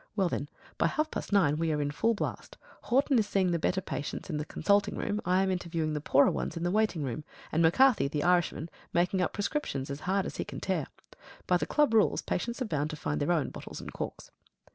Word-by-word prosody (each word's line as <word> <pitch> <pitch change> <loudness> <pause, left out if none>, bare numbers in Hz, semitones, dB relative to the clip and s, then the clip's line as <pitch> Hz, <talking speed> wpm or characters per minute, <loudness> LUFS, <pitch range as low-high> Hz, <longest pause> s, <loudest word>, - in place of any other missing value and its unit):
Well, 190 -4 +2
then, 145 -2 -3 0.3
by - - +4
half 310 - -1
past - - -5
nine 165 -8 +4
we 165 0 0
are 150 - 0
in 145 0 -1
full 225 +10 +1
blast. - - -5 0.3
Horton 270 0 +3
is 210 - +1
seeing 190 -3 +1
the 170 - +1
better 190 - 0
patients 150 +1 -5
in 150 - -1
the 150 - -3
consulting 200 +5 +1
room, 210 +1 -2
I 185 +1 +3
am 190 - +1
interviewing 165 -4 -2
the 150 - -2
poorer 140 -1 +4
ones - - -3
in 165 - -3
the 175 - +1
waiting 210 -6 +1
room, 135 +3 -4 0.3
and 160 - +2
McCarthy, 215 - +5
the 145 +1 -2
Irishman, 175 -2 +1 0.2
making 180 +2 +2
up - - +1
prescriptions 200 - -2
as 140 - -4
hard 190 +4 0
as - - -6
he - - -1
can - - -7
tear. - - -1 0.6
By 180 - +3
the - - -3
club 295 -6 +3
rules, 220 -2 +3
patients 235 +6 -2
are - - -3
bound 150 -7 -1
to 155 - -5
find 145 0 -2
their 145 - +1
own 165 -4 +1
bottles - - -8
and - - -8
corks. - - -6
175 Hz, 235 wpm, -30 LUFS, 150-205 Hz, 0.6 s, McCarthy